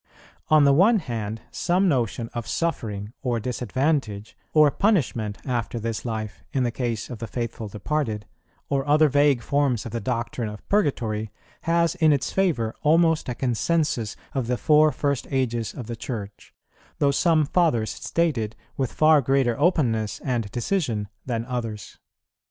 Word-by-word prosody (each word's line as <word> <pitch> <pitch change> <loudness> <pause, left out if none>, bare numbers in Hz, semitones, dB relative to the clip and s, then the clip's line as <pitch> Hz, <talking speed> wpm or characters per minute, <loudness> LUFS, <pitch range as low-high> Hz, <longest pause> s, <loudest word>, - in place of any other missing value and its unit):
On 155 -1 +6
the 140 -1 +5
one 205 +10 +5
hand, 115 - -4
some 185 +3 +1
notion 120 - 0
of 120 -2 -4
suffering, 110 -10 -2
or 120 -4 0
disadvantage, 125 -2 -1 0.2
or 150 -2 +5
punishment 130 - +1
after 120 -2 -2
this 115 +1 -4
life, 110 -3 -4
in 130 - +1
the 120 - 0
case 120 -3 -3
of 120 - -6
the 115 - -5
faithful 115 0 -4
departed, 110 0 -2 0.4
or 140 -1 0
other 155 +1 +5
vague 145 -3 +3
forms 140 -5 +1
of 115 - -6
the 115 - -2
doctrine 120 -2 -2
of 105 0 -11
Purgatory, 115 - 0 0.4
has 170 0 +2
in 160 -4 +3
its 140 -3 0
favour 150 -13 +1
almost 160 -1 +3
a 120 - -2
consensus 125 -1 0 0.2
of 130 -4 -1
the 125 0 0
four 155 +2 +5
first 140 -1 -1
ages 120 -4 -1
of 125 - -6
the 120 +1 -5
Church, 110 -3 -7 0.5
though 140 -1 +3
some 155 +1 +3
Fathers 150 -9 +1
state 165 -7 0
it 110 0 -4 0.2
with 130 -3 -1
far 155 -1 +5
greater 135 -2 +2
openness 120 - +1
and 120 -6 -2
decision 120 - -1 0.2
than 115 -2 -2
others. 115 -5 -5
125 Hz, 155 wpm, -24 LUFS, 115-150 Hz, 0.5 s, On